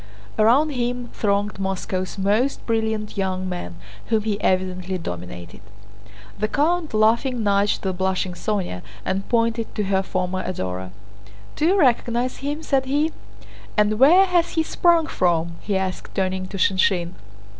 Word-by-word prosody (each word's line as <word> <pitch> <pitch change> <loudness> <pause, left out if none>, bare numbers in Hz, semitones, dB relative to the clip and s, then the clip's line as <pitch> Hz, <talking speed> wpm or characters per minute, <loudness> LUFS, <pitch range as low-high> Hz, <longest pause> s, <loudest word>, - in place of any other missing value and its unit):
Around 260 +8 +4
him 245 -2 -2
thronged 205 -1 0
Moscow's 190 -1 -3
most 210 +8 +1
brilliant 220 -2 -1
young 185 -1 -1
men, 175 - -5 0.3
whom 220 -2 +1
he 210 -1 -2
evidently 185 0 0
dominated. 90 - -7 0.8
The 215 - +1
count, 310 +2 0
laughing, 230 +3 +2
nudged 200 0 +2
the 190 -1 -1
blushing 190 0 -1
Sónya 180 - -2 0.2
and 195 +1 -2
pointed 230 -1 0
to 210 - 0
her 190 -1 +1
former 185 0 -2
adorer. 95 - -4 0.7
"Do 310 - +1
you 385 +3 +3
recognize 245 -3 +2
him?" 290 +3 -4
said 270 -3 +1
he. 295 +4 +1 0.7
"And 210 +1 +2
where 345 +9 +7
has 350 -2 +1
he 320 - +2
sprung 335 0 +3
from?" 170 - 0
he 200 -2 -1
asked, 190 -1 -4
turning 185 -1 -1
to 195 - -6
Shinshín. 185 -2 +2
205 Hz, 145 wpm, -22 LUFS, 185-245 Hz, 0.8 s, where